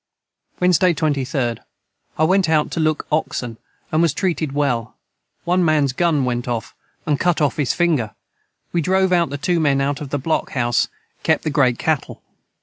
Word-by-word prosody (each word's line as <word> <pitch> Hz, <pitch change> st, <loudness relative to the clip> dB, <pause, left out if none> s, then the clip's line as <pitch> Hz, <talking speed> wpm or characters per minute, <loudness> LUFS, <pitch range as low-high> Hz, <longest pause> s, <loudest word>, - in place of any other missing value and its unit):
Wednesday 180 Hz, -1 st, +3 dB
23d. 135 Hz, -6 st, -1 dB, 0.6 s
I 155 Hz, -, +2 dB
went 185 Hz, +1 st, +3 dB
out 155 Hz, -2 st, +2 dB
to -, -, -3 dB
look 155 Hz, -1 st, 0 dB
oxen 125 Hz, -6 st, -2 dB, 0.3 s
and 155 Hz, 0 st, +2 dB
was 165 Hz, -4 st, +2 dB
treated 165 Hz, -6 st, -1 dB
well 135 Hz, -6 st, -1 dB, 0.5 s
1 180 Hz, +1 st, +2 dB
mans 150 Hz, -5 st, +2 dB
gun 155 Hz, -3 st, +1 dB
went 120 Hz, 0 st, -2 dB
of 120 Hz, -2 st, -3 dB, 0.3 s
and 145 Hz, -2 st, 0 dB
cut 175 Hz, -2 st, +1 dB
of 145 Hz, -3 st, +1 dB
his 145 Hz, -4 st, +1 dB
finger 155 Hz, -11 st, +1 dB, 0.6 s
we 170 Hz, -, +2 dB
drove 190 Hz, +3 st, +2 dB
out 170 Hz, -3 st, +3 dB
the 140 Hz, -, -4 dB
2 170 Hz, +4 st, 0 dB
men 145 Hz, -3 st, +2 dB
out 140 Hz, +1 st, -1 dB
of 145 Hz, -, -6 dB
the 145 Hz, -, -1 dB
Block 155 Hz, +4 st, -2 dB
House 120 Hz, -2 st, +1 dB, 0.3 s
kep -, -, +1 dB
the 155 Hz, -, -1 dB
great 130 Hz, -5 st, +2 dB
Cattle. 155 Hz, -4 st, -2 dB
150 Hz, 175 wpm, -20 LUFS, 135-170 Hz, 0.6 s, Wednesday